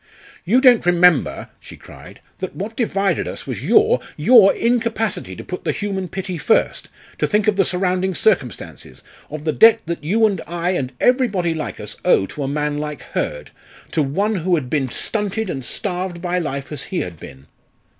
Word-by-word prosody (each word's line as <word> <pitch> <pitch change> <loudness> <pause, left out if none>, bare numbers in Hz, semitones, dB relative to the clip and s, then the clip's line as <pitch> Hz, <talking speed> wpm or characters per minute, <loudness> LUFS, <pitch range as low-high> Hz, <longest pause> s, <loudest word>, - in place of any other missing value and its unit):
"You 235 +9 +3
don't 250 -4 +6
remember," 175 -3 +3
she - - -12
cried, - - -14 0.2
"that 185 - -5
what 210 +4 -5
divided 200 -5 0
us - - -7
was - - -5
your 435 +3 +4 0.2
your 225 -6 +7
incapacity 225 - -1
to - - -9
put 180 - -7
the - - 0
human 195 -3 -3
pity 185 -1 -5
first; 220 - +1 0.3
to - - +1
think 210 0 +1
of 210 - +3
the 195 - +3
surrounding 185 0 -1
circumstances 145 - -2 0.3
of 150 0 -7
the 155 -1 0
debt 225 0 +6
that 170 -2 -4
you 215 +9 +2
and 200 -5 0
I 170 +2 -2
and 130 -8 -2
everybody 215 -10 +2
like 160 -1 -5
us - - -7
owe 95 - +4
to 145 - -8
a 135 - -1
man 150 +1 -2
like 150 -1 -5
Hurd 75 0 -3 0.4
to 160 - +1
one 195 +10 0
who 180 +1 +1
had 130 -6 -4
been 140 -4 0
stunted 210 - -2
and 135 - -5
starved 180 - -3
by 180 +1 -1
life 140 -4 -4
as 150 - -5
he 185 - -1
had 85 -3 -7
been." 65 +1 -12
180 Hz, 185 wpm, -20 LUFS, 150-210 Hz, 0.4 s, your